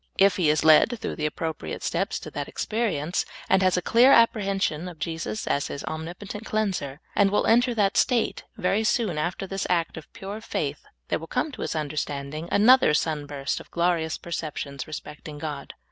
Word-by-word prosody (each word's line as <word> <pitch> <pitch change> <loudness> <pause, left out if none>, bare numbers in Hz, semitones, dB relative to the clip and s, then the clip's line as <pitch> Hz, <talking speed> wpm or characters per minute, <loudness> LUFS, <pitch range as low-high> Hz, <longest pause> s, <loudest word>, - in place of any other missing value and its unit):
If 195 0 +5
he 170 -5 +3
is 155 +1 +2
led 160 +10 +6
through - - -4
the 155 -1 0
appropriate 160 +1 -4
steps - - -1
to - - -8
that - - -4
experience, 190 -8 -1 0.2
and 190 0 +4
has 185 -1 +3
a 180 - -1
clear 245 +7 +6
apprehension 195 - +3
of 175 -2 -9
Jesus 160 -11 -4
as 140 - 0
his 140 - -6
omnipotent 175 +7 -6
cleanser, 190 -11 -2 0.2
and 200 -1 +4
will 205 - +1
enter 240 +1 +4
that 205 +1 +2
state, 245 -2 +2
very 195 +4 +1
soon 215 -7 +1
after 175 +4 -2
this 195 0 -3
act 170 -3 0
of 160 - -10
pure 200 +3 -7
faith - - -3 0.3
there - - 0
will - - -9
come 315 - -1
to - - -9
his - - -2
understanding 150 0 -3
another 225 -6 +6
sun 150 -2 -1
burst 140 -2 -3
of - - -13
glo 175 +1 +2
rious 160 -2 -2
perceptions 150 -5 -5
respecting 150 0 -8
God. 145 -2 -6
175 Hz, 190 wpm, -25 LUFS, 150-205 Hz, 0.3 s, led